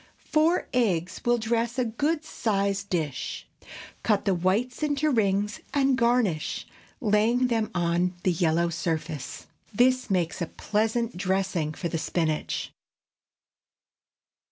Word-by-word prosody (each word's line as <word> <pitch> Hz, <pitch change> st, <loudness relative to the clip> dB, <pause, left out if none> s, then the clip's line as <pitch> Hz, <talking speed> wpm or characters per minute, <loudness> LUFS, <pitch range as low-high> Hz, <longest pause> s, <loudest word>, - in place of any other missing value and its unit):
Four 320 Hz, +3 st, +3 dB
eggs 185 Hz, -8 st, 0 dB
will 240 Hz, 0 st, +3 dB
dress 235 Hz, +1 st, -1 dB
a 255 Hz, -, +2 dB
good 295 Hz, +8 st, -1 dB
sized 200 Hz, -4 st, -1 dB
dish. 155 Hz, -6 st, -3 dB, 0.5 s
Cut 210 Hz, -3 st, +1 dB
the 195 Hz, -, +3 dB
whites 195 Hz, -, 0 dB
into 300 Hz, 0 st, +1 dB
rings 205 Hz, -3 st, +1 dB, 0.2 s
and 275 Hz, -1 st, +3 dB
garnish, 235 Hz, -9 st, +1 dB, 0.3 s
laying 230 Hz, +4 st, +2 dB
them 225 Hz, -2 st, 0 dB
on 175 Hz, +1 st, +1 dB
the 185 Hz, -, +3 dB
yellow 170 Hz, 0 st, +2 dB
surface. 160 Hz, -3 st, -3 dB, 0.3 s
This 255 Hz, +3 st, +3 dB
makes 180 Hz, -3 st, 0 dB
a 170 Hz, -, 0 dB
pleasant 225 Hz, +3 st, -1 dB
dressing 185 Hz, -5 st, 0 dB
for 175 Hz, -, -3 dB
the 165 Hz, -1 st, -2 dB
spinach. 160 Hz, -2 st, -1 dB
205 Hz, 120 wpm, -27 LUFS, 175-240 Hz, 0.5 s, Four